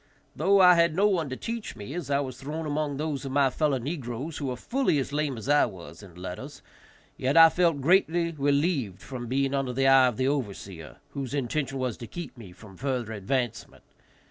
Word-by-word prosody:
Though 200 +1 +3
I 180 -1 +8
had 170 -2 +3
no 200 +3 +4
one 170 -8 0
to 130 - -4
teach 230 - -5
me, 105 +5 -8
as 170 -4 -5
I 140 0 +2
was 130 -2 -6
thrown 155 +4 -4
among 150 -1 -2
those 150 -2 -3
of 135 - -5
my 135 -1 +3
fellow 145 0 +1
negroes 135 +1 -5
who 140 - -3
were 125 - -2
fully 245 - 0
as 140 0 -2
lame 145 -4 -1
as 110 - -8
I 145 +1 +4
was 95 -4 -11
in 95 -5 -14
letters, 95 +11 -8 0.5
yet 135 +5 0
I 165 0 +10
felt 165 -4 +1
greatly 170 +1 +3
relieved 140 - 0
from 125 -3 -6
being 135 +2 0
under 135 -2 -1
the 135 +2 +1
eye 135 -1 +7
of 125 - -2
the 130 0 +1
overseer, 100 - -4
whose 140 -2 -5
intention 135 +1 -2
was 130 -4 -2
to 120 - -8
keep 150 -2 -8
me 110 -7 -11
from 95 +1 -14
further 125 -5 -2
advancement. 120 +3 -3
135 Hz, 210 wpm, -27 LUFS, 125-155 Hz, 0.5 s, I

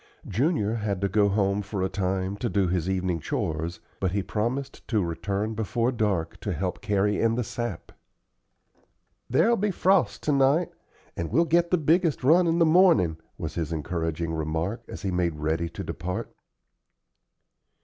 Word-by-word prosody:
Junior 115 - +1
had 105 -3 -2
to 100 - +2
go 100 +1 +3
home 100 0 +1
for 100 -1 -3
a - - +2
time 95 0 -1
to 120 +3 -2
do 100 -3 +1
his 90 0 -1
evening 95 -3 0
"chores," 80 +3 -3 0.2
but 95 -2 0
he 100 -1 0
promised 120 +8 -3
to 105 -6 +1
return 100 +6 -2
before 115 +3 0
dark 105 -9 -1
to - - -3
help - - -3
carry 105 0 +1
in 115 0 +2
the 125 - 0
sap. 120 -5 -5 1.4
"There'll 230 - +3
be 210 +2 +1
frost 190 -1 +2
to 150 - +1
night, 140 +5 +3 0.4
and 85 -2 -3
we'll 170 - +3
get 170 +1 +2
the 180 - +3
biggest 160 -1 +2
run 170 +6 +5
in 165 0 +2
the 170 - +5
morning," 160 - +4 0.2
was 80 -1 -5
his 80 -1 -3
encouraging 80 +1 -2
remark, 80 +7 -2
as 85 - -8
he 95 - -1
made 90 -3 0
ready 80 +2 -1
to - - -7
depart. 90 +1 -5
100 Hz, 170 wpm, -26 LUFS, 85-130 Hz, 1.4 s, run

